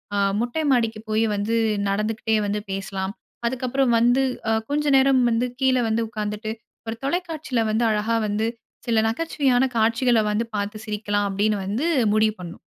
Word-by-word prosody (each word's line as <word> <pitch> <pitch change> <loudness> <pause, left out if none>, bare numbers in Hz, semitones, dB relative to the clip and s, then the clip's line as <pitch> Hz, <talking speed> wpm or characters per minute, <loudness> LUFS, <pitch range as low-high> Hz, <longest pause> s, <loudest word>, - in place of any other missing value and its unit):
ஆ - - 0 0.2
மொட்டை 245 +6 -1
மாடிக்கு 230 -3 +1
போய் 215 +1 +2
வந்து 210 +3 -1 0.3
நடந்துக்கிட்டே 220 +2 0
வந்து 210 +1 -1
பேசலாம். 195 0 -3 0.3
அதுக்கப்புறம் 255 0 0
வந்து 245 +3 +4 0.3
அ - - +3 0.2
கொஞ்சம் 290 -1 +2
நேரம் 265 -1 +4
வந்து 235 +2 +1
கீழே 260 -1 +3
வந்து 225 +1 +1
உட்காந்துட்டு 215 0 -4 0.4
ஒரு 225 - -3
தொலைக்காட்சியில 315 -5 -1
வந்து 220 +2 +1
அழகா 215 +2 0
வந்து 210 +2 0 0.4
சில 230 -1 +3
நகைச்சுவையான 265 -1 +1
காட்சிகள 230 +1 +3
வந்து 225 +3 0
பார்த்து 205 +1 -3
சிரிக்கலாம். 205 -1 -1
அப்பிடின்னு 205 +1 0
வந்து 225 +11 -1 0.3
முடிவு 215 0 +3
பண்ணோம். 170 -1 -9
225 Hz, 150 wpm, -23 LUFS, 210-255 Hz, 0.4 s, வந்து